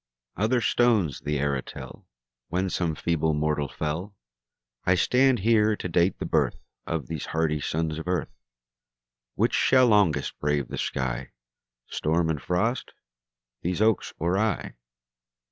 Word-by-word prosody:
Other 115 Hz, +5 st, +1 dB
stones 110 Hz, -, +2 dB
the 75 Hz, 0 st, -2 dB
era 70 Hz, -1 st, 0 dB
tell -, -, -10 dB, 0.4 s
When 95 Hz, +1 st, -1 dB
some 85 Hz, -2 st, -1 dB
feeble 80 Hz, -1 st, 0 dB
mortal 75 Hz, -1 st, 0 dB
fell; 80 Hz, -, -4 dB, 0.7 s
I 90 Hz, -, +3 dB
stand 130 Hz, +7 st, +3 dB
here 110 Hz, 0 st, +3 dB
to 95 Hz, -, -5 dB
date 85 Hz, +2 st, +2 dB
the -, -, -4 dB
birth -, -, +1 dB, 0.3 s
Of 80 Hz, -5 st, -2 dB
these 75 Hz, +3 st, -5 dB
hardy 80 Hz, -2 st, 0 dB
sons 80 Hz, +1 st, -2 dB
of 80 Hz, -, -7 dB
earth. 90 Hz, -9 st, -2 dB, 1.0 s
Which -, -, +1 dB
shall 130 Hz, -1 st, +5 dB
longest 100 Hz, -, +2 dB
brave 75 Hz, -3 st, 0 dB
the -, -, -5 dB
sky, -, -, -3 dB, 0.5 s
Storm 80 Hz, +1 st, 0 dB
and 75 Hz, -3 st, -3 dB
frost 90 Hz, -, -1 dB, 0.7 s
these 90 Hz, +2 st, -2 dB
oaks 110 Hz, -2 st, +2 dB
or 85 Hz, +4 st, 0 dB
I? 110 Hz, -3 st, -1 dB
85 Hz, 140 wpm, -26 LUFS, 75-105 Hz, 1.0 s, shall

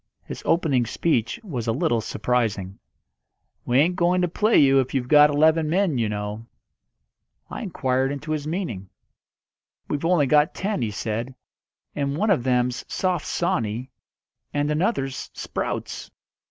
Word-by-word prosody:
His -, -, -8 dB
opening 145 Hz, -8 st, +2 dB
speech 120 Hz, -, 0 dB
was 125 Hz, -, -5 dB
a -, -, +2 dB
little 115 Hz, 0 st, +1 dB
surprising. 105 Hz, -4 st, -1 dB, 0.9 s
"We 120 Hz, -, +2 dB
ain't 170 Hz, +6 st, +3 dB
going 180 Hz, +1 st, +2 dB
to -, -, +2 dB
play 215 Hz, +6 st, +2 dB
you 135 Hz, -1 st, +6 dB
if 130 Hz, +1 st, -2 dB
you've 125 Hz, -2 st, -1 dB
got 150 Hz, +2 st, +7 dB
eleven 155 Hz, +2 st, +3 dB
men, 175 Hz, -6 st, +1 dB
you 110 Hz, -2 st, 0 dB
know." 105 Hz, +2 st, -5 dB, 1.0 s
I -, -, -5 dB
inquired 135 Hz, -, 0 dB
into 145 Hz, +2 st, -5 dB
his 150 Hz, -1 st, -2 dB
meaning. 155 Hz, -, -4 dB, 1.0 s
"We've 145 Hz, 0 st, -2 dB
only 165 Hz, -3 st, +3 dB
got 150 Hz, +4 st, +3 dB
ten," 200 Hz, -4 st, -2 dB
he 115 Hz, -, 0 dB
said. 115 Hz, +5 st, -4 dB, 0.6 s
"And 140 Hz, 0 st, -1 dB
one 215 Hz, +4 st, +2 dB
of 155 Hz, -11 st, +2 dB
them's 125 Hz, -1 st, 0 dB
Soft 180 Hz, -4 st, -1 dB
Sawney, 120 Hz, -6 st, -1 dB, 0.6 s
and 145 Hz, +1 st, 0 dB
another's 150 Hz, -, -1 dB
Sprouts." -, -, -4 dB
140 Hz, 145 wpm, -24 LUFS, 120-165 Hz, 1.0 s, got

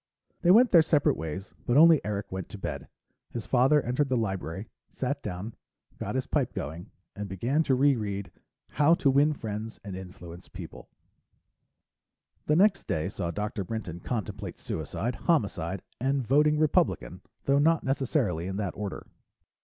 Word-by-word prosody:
They 175 Hz, -, +2 dB
went 235 Hz, +6 st, +7 dB
their 170 Hz, -, +8 dB
separate 155 Hz, -2 st, +3 dB
ways, 80 Hz, +5 st, -6 dB
but 120 Hz, -, +3 dB
only 160 Hz, -1 st, +7 dB
Eric 100 Hz, -1 st, -3 dB
went 95 Hz, -1 st, -5 dB
to -, -, -8 dB
bed. 95 Hz, -, -5 dB, 0.4 s
His 115 Hz, -3 st, -5 dB
father 135 Hz, +3 st, +4 dB
entered 130 Hz, +4 st, 0 dB
the 130 Hz, -, +2 dB
library, 95 Hz, -2 st, -3 dB, 0.2 s
sat 140 Hz, +2 st, -3 dB
down, 105 Hz, +2 st, -5 dB, 0.5 s
got -, -, -3 dB
his -, -, 0 dB
pipe -, -, 0 dB
going, 80 Hz, +7 st, -5 dB, 0.3 s
and 100 Hz, 0 st, -5 dB
began 120 Hz, -, 0 dB
to 135 Hz, -4 st, +2 dB
reread 105 Hz, -9 st, +1 dB, 0.4 s
How 150 Hz, +3 st, +4 dB
to 140 Hz, -5 st, +2 dB
Win 145 Hz, +3 st, +4 dB
Friends 110 Hz, -3 st, -6 dB
and 100 Hz, -2 st, -6 dB
Influence 90 Hz, -1 st, -10 dB
People. -, -, -10 dB, 1.6 s
The 150 Hz, -, +4 dB
next 195 Hz, +3 st, +3 dB
day 80 Hz, +3 st, -1 dB
saw 95 Hz, -4 st, -3 dB
Dr. 105 Hz, +2 st, -3 dB
Brinton 95 Hz, -4 st, -5 dB
contemplate 110 Hz, 0 st, -4 dB
suicide, 120 Hz, +2 st, -3 dB
homicide, 100 Hz, -, 0 dB, 0.2 s
and 135 Hz, +1 st, 0 dB
voting 150 Hz, +4 st, +4 dB
Republican, 155 Hz, -, +1 dB, 0.2 s
though 140 Hz, +1 st, +3 dB
not 165 Hz, +2 st, +3 dB
necessarily 130 Hz, -, 0 dB
in 95 Hz, 0 st, -3 dB
that 100 Hz, -3 st, -2 dB
order. 105 Hz, -1 st, -5 dB
115 Hz, 155 wpm, -28 LUFS, 95-145 Hz, 1.6 s, their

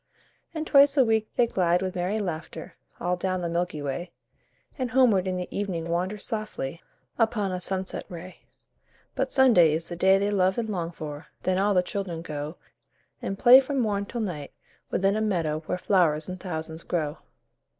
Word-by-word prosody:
And 315 Hz, -1 st, -4 dB
twice 285 Hz, 0 st, +5 dB
a 265 Hz, -, +6 dB
week 220 Hz, -1 st, +1 dB
they 245 Hz, -, +4 dB
glide 180 Hz, -4 st, +1 dB
with 185 Hz, -1 st, -2 dB
merry 185 Hz, +4 st, -1 dB
laughter 175 Hz, -6 st, -5 dB, 0.3 s
All 180 Hz, +1 st, 0 dB
down 185 Hz, 0 st, -2 dB
the 175 Hz, -, -1 dB
Milky 170 Hz, -3 st, -2 dB
Way, 145 Hz, +6 st, -3 dB, 0.7 s
And 255 Hz, -3 st, -2 dB
homeward 225 Hz, -7 st, +4 dB
in 185 Hz, -1 st, -1 dB
the 180 Hz, -, -4 dB
evening 175 Hz, -5 st, -3 dB
wander 180 Hz, +5 st, -1 dB
softly 205 Hz, -8 st, -4 dB, 0.4 s
Upon 220 Hz, -4 st, +1 dB
a 180 Hz, 0 st, -3 dB
sunset 190 Hz, 0 st, -3 dB
ray. 180 Hz, +1 st, -9 dB, 0.7 s
But -, -, -1 dB
Sunday 220 Hz, -, +5 dB
is 160 Hz, +1 st, -3 dB
the 175 Hz, -, -4 dB
day 190 Hz, +2 st, +4 dB
they 200 Hz, +1 st, 0 dB
love 190 Hz, -1 st, +2 dB
and 230 Hz, -2 st, -2 dB
long 175 Hz, -5 st, -2 dB
for, 155 Hz, -2 st, -8 dB, 0.2 s
Then 185 Hz, 0 st, +1 dB
all 200 Hz, 0 st, +2 dB
the 180 Hz, -, +4 dB
children 180 Hz, -4 st, -4 dB
go 150 Hz, +1 st, -5 dB, 0.6 s
And 195 Hz, -, -3 dB
play 245 Hz, +5 st, +9 dB
from 275 Hz, +1 st, -2 dB
morn 205 Hz, -4 st, 0 dB
till 240 Hz, -, -4 dB
night 160 Hz, -9 st, -5 dB, 0.4 s
within 195 Hz, +2 st, +1 dB
a 215 Hz, -, 0 dB
meadow 165 Hz, -8 st, 0 dB
Where -, -, -1 dB
flowers 170 Hz, -5 st, +2 dB
in 185 Hz, 0 st, -5 dB
thousands 160 Hz, -3 st, -5 dB
grow. 155 Hz, -5 st, -2 dB
185 Hz, 180 wpm, -26 LUFS, 170-210 Hz, 0.7 s, play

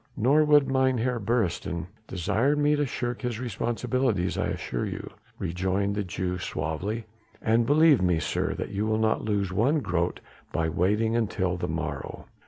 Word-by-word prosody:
"Nor 140 Hz, +7 st, +4 dB
would 145 Hz, -2 st, +5 dB
Mynheer 130 Hz, -2 st, +1 dB
Beresteyn 100 Hz, -6 st, -1 dB, 0.2 s
desire 105 Hz, -, +1 dB
me 150 Hz, 0 st, +3 dB
to 145 Hz, -1 st, 0 dB
shirk 120 Hz, -1 st, -3 dB
his 120 Hz, -3 st, -3 dB
responsibilities, 120 Hz, -3 st, -1 dB
I -, -, 0 dB
assure 60 Hz, -, -3 dB
you," -, -, -6 dB, 0.3 s
rejoined 95 Hz, +4 st, -1 dB
the 105 Hz, 0 st, -1 dB
Jew 90 Hz, 0 st, -3 dB
suavely, 90 Hz, +9 st, -3 dB, 0.3 s
"and 115 Hz, +1 st, +2 dB
believe 150 Hz, -, +5 dB
me, 90 Hz, -2 st, +3 dB
sir, -, -, -1 dB
that -, -, -4 dB
you 105 Hz, +2 st, -1 dB
will 110 Hz, 0 st, +1 dB
not 110 Hz, 0 st, +1 dB
lose 100 Hz, -3 st, -1 dB
one 130 Hz, +10 st, +3 dB
grote 85 Hz, -6 st, -1 dB, 0.3 s
by 80 Hz, -1 st, 0 dB
waiting 105 Hz, +7 st, +1 dB
until 100 Hz, -5 st, 0 dB
the 90 Hz, -, -3 dB
morrow. -, -, -4 dB
110 Hz, 160 wpm, -27 LUFS, 95-125 Hz, 0.3 s, would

